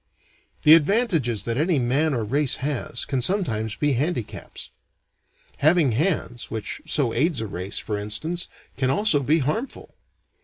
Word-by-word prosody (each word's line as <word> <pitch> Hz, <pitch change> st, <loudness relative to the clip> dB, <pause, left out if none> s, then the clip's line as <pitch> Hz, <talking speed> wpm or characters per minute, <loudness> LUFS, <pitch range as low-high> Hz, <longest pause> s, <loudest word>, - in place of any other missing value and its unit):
The 150 Hz, -, +8 dB
advantages 165 Hz, -, +2 dB
that 115 Hz, 0 st, -2 dB
any 160 Hz, +2 st, +2 dB
man 135 Hz, +4 st, +1 dB
or 115 Hz, -, -1 dB
race 135 Hz, +5 st, +1 dB
has, 135 Hz, -4 st, -3 dB
can 135 Hz, -3 st, -1 dB
sometimes 115 Hz, -, 0 dB
be 145 Hz, -1 st, +1 dB
handicaps. 130 Hz, -3 st, -4 dB, 0.9 s
Having 155 Hz, -2 st, +3 dB
hands, 125 Hz, -, -1 dB
which 110 Hz, -2 st, -5 dB
so 130 Hz, -6 st, +1 dB
aids 150 Hz, +1 st, +1 dB
a 110 Hz, -, -3 dB
race, 95 Hz, -1 st, -4 dB
for 105 Hz, -1 st, -3 dB
instance, 160 Hz, +12 st, -2 dB, 0.3 s
can 130 Hz, -1 st, +1 dB
also 200 Hz, +1 st, +3 dB
be 150 Hz, +4 st, +2 dB
harmful. 225 Hz, -, -4 dB
140 Hz, 145 wpm, -24 LUFS, 115-160 Hz, 0.9 s, The